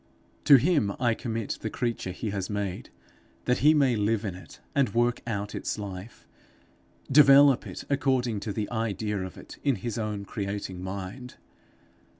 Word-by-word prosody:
To 145 - +9
him 135 - +3
I 120 -2 +2
commit 115 -2 -4
the 110 - -3
creature 115 -4 -3
he 100 +4 -4
has 95 -2 -3
made, 100 -3 -3 0.6
that 125 - +2
he 150 +4 +5
may 135 -5 +3
live 110 +1 0
in 100 - -3
it, 90 - -13
and 130 -7 +1
work 120 0 +2
out 105 -2 -3
its - - -3
life 100 +2 -8 0.9
develop 140 -1 +7
it - - -7
according 130 -5 +1
to 105 +1 -4
the 105 +1 -2
idea 110 -2 -2
of 95 -1 -7
it - - -12
in 140 -3 +2
his 115 +3 -4
own 105 -2 -3
creating 100 -3 -4
mind. 100 +7 -6
110 Hz, 160 wpm, -27 LUFS, 100-125 Hz, 0.9 s, To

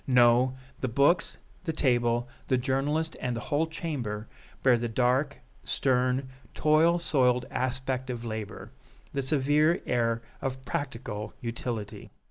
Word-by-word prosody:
No, 125 0 +5 0.2
the 130 - -1
books, 140 +8 +2 0.3
the 165 -3 -2
table, 120 -4 +2 0.2
the 130 - +3
journalist 145 +5 0
and 125 -1 -1
the - - -3
whole 160 +3 +3
chamber 135 - -4 0.4
bear 130 -2 +6
the 120 0 -2
dark, 125 +5 +1 0.3
stern, 130 0 +1 0.3
toil 155 +3 +4
soiled 125 -7 +2
aspect 130 0 -2
of 120 -1 -4
labor, 110 -1 -5 0.4
the 140 - 0
severe 150 +4 +3
air 115 -1 +1 0.2
of 130 0 -4
practical 115 -6 -4
utility. 115 -2 -5
130 Hz, 125 wpm, -28 LUFS, 120-145 Hz, 0.4 s, bear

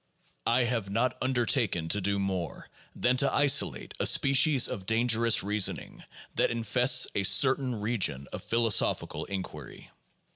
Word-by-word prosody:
I 120 +2 +2
have 115 -5 -3
not 120 +5 -1
undertaken 120 - -1
to 105 - +1
do 100 +1 -2
more 95 -3 -5 0.3
than 125 +1 0
to 140 +1 +1
isolate 145 -1 +1
a - - +2
species 140 0 +3
of 95 -1 -8
dangerous 115 0 +2
reasoning 105 0 -2 0.3
that - - 0
infests 125 +2 +2
a - - -1
certain 125 +4 +2
region 100 - -2
of - - -7
philosophical 115 -2 0
inquiry. 90 -8 -9
115 Hz, 135 wpm, -27 LUFS, 100-125 Hz, 0.3 s, species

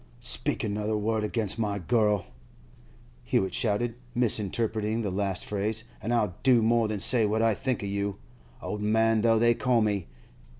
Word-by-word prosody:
'Speak - - -1
another 105 0 -1
word 110 +1 -1
against 110 0 -1
my 105 -2 -1
girl,' 105 +1 +1 1.0
Hewett 95 -1 0
shouted, 115 +3 0 0.2
misinterpreting 110 -1 0
the 100 - -2
last 95 -1 -1
phrase, 105 +2 0 0.2
'an' 115 - -3
I'll 105 -6 +1
do 125 -4 +4
more 115 0 +3
than 105 -1 -3
say 115 +3 +3
what 110 +2 +1
I 115 -1 +3
think 125 +2 -2
of 100 - -3
you—old 100 0 -6
man 110 +1 +2
though 115 0 +4
they 120 +1 +4
call 125 0 +1
me! 100 -6 0
110 Hz, 160 wpm, -27 LUFS, 105-115 Hz, 1.0 s, do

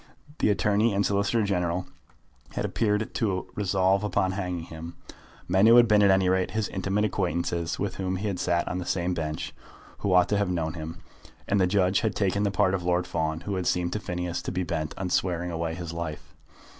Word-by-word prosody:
The - - +3
Attorney 105 +2 +2
and 100 - +2
Solicitor 100 +3 +1
General 90 -2 0 0.7
had - - -2
appeared 105 -1 0
to 105 -7 0
him - - -17
resolved 95 0 +2
upon 95 -2 +1
hanging 90 -3 -3
him, 80 +1 -9 0.5
men 95 +4 +4
who 115 - +8
had 120 -1 +7
been, 105 -1 +5
at 100 - +5
any 95 -1 +4
rate, 95 0 +2
his 110 -1 -1
intimate 95 +2 0
acquaintances, 85 -4 -1
with 100 - -3
whom 95 -1 -1
he 95 +3 -4
had 95 -3 -2
sat 85 0 +1
on 90 - -2
the 90 - -5
same 90 0 0
bench, 80 -2 -4 0.5
who 100 - -1
ought 90 -1 +5
to 105 - +2
have 100 -3 0
known 80 -3 -1
him. 80 -1 -7 0.4
And 100 -1 +2
the 90 - +4
judge 95 0 +2
had 110 -3 -1
taken 100 0 +1
the 105 - +2
part 95 0 +2
of 95 - 0
Lord 90 +1 +1
Fawn, 80 -2 -2
who 100 +4 -4
had 90 - -2
seemed 90 -1 0
to 105 - -1
Phineas 90 -3 -3
to - - -4
be 90 0 -1
bent 80 -3 -3
on 90 -2 -3
swearing 90 -1 0
away 80 -1 -2
his 85 -1 -6
life. 85 -2 -6
95 Hz, 220 wpm, -27 LUFS, 85-100 Hz, 0.7 s, who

